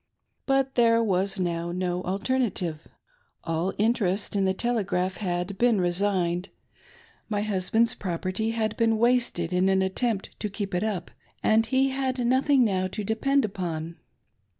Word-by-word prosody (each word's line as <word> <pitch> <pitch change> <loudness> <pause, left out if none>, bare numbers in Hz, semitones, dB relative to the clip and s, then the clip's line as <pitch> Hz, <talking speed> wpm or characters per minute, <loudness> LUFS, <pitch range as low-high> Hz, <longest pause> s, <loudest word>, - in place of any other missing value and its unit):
But 270 -1 +2
there 230 -1 +4
was 195 -2 0
now 170 -1 -1
no 180 0 -2
alternative. 190 -5 -1 0.6
All 165 +3 -1
interest 210 -3 0
in 195 -1 +2
the 190 - +2
Telegraph 195 -5 0
had 180 0 -3
been 235 -4 +3
resigned; 180 0 +1 0.8
my 205 -1 0
hus 190 -4 -2
band's 230 +1 +3
property 185 +4 -3
had 220 -1 -1
been 225 -1 +2
wasted 235 -7 +1
in 185 +1 +3
an 190 0 +3
attempt 195 +2 -1
to 210 - -2
keep 200 -1 -5
it 180 - 0
up, 200 -6 -3 0.3
and 225 +1 +3
he 265 +3 +2
had 265 -1 -2
nothing 260 +1 +3
now 185 -3 0
to 210 +3 -5
depend 265 +6 +1
upon. 170 -4 -4
200 Hz, 150 wpm, -26 LUFS, 180-230 Hz, 0.8 s, there